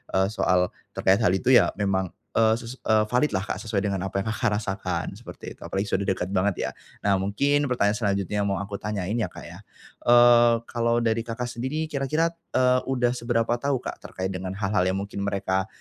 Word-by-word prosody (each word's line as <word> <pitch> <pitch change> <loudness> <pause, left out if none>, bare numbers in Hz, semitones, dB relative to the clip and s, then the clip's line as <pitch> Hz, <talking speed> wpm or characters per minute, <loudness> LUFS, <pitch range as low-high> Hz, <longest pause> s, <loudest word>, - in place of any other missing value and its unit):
eee, 95 0 +3
soal 90 -4 +2 0.2
terkait 95 +1 +3
hal 105 -6 +3
itu 125 +7 +1
ya - - +7
memang, 95 -3 0 0.2
eee, 110 0 +4
ses 120 +2 -8
eee, 110 -1 +2
valid 125 +5 +2
lah 95 - 0
Kak, - - -4
sesuai 105 -3 -1
dengan 100 -2 -1
apa 100 0 -2
yang - - -7
Kakak, 110 -2 0
rasakan 95 -4 -3
seperti - - -9
itu - - -33
apalagi 95 +1 -1
sudah 100 0 0
dekat 95 0 -1
banget 95 0 +1
ya, - - -8 0.3
nah 100 -1 +3
mungkin 140 +9 +1
pertanyaan 105 -5 +2
selanjutnya 100 -1 0
mau 100 -1 0
aku 100 0 -6
tanyain 105 -2 -3
ya 110 - 0
Kak, - - -11
ya, - - -10 0.5
eee, 120 -1 +7
kalau 115 0 0
dari 115 0 +1
Kakak, 115 +2 -3
sendiri 130 +7 -3
kira-kira, 155 +4 0 0.2
eee, 125 0 +4
udah 125 -2 +2
seberapa 120 -2 0
tahu 140 -1 +1
Kak, - - -6
terkait 95 +1 -4
dengan 95 +1 -5
hal-hal 100 -1 +1
yang 95 - -1
mungkin 100 0 -5
mereka, 95 -1 -1
105 Hz, 200 wpm, -25 LUFS, 95-120 Hz, 0.5 s, ya